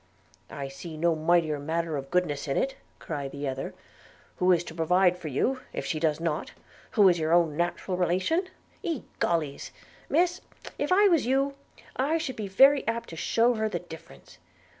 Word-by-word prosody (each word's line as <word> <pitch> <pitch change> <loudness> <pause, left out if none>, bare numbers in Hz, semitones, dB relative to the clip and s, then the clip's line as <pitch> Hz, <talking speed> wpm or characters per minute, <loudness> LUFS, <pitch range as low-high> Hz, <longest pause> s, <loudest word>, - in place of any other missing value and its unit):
'I 140 -1 -5
see 155 +4 -9
no 165 +1 +2
mighty 160 0 +2
matter 160 +2 -2
of 135 -1 -5
goodness 155 -5 0
in 135 - -1
it,' 270 - 0 0.2
cried 145 -4 -5
the 140 0 -4
other: 135 0 -4 0.6
'who 185 0 +3
is 175 -1 +3
to 165 - -9
provide 180 +2 +3
for 180 -3 -8
you, 250 - 0
if - - -4
she 155 - -2
does 155 -1 +1
not, 165 -2 -2 0.4
who 205 -2 +7
is 175 -2 +4
your 160 0 0
own 170 -3 +3
natural 175 +2 -2
relation? 185 - +1 0.4
Egollys! 170 - -2 0.4
Miss, 350 +4 +2 0.4
if 290 - -1
I 405 +3 +6
was 330 -10 +3
you, 275 +2 +2 0.4
I 290 +5 +1
should 305 -5 -4
be 210 -2 -4
very 270 +8 +6
apt 230 +1 -2
to 165 - -8
shew 230 +8 +2
her 220 -1 -1
the 180 - -2
difference. 160 - -13
175 Hz, 180 wpm, -27 LUFS, 155-240 Hz, 0.6 s, who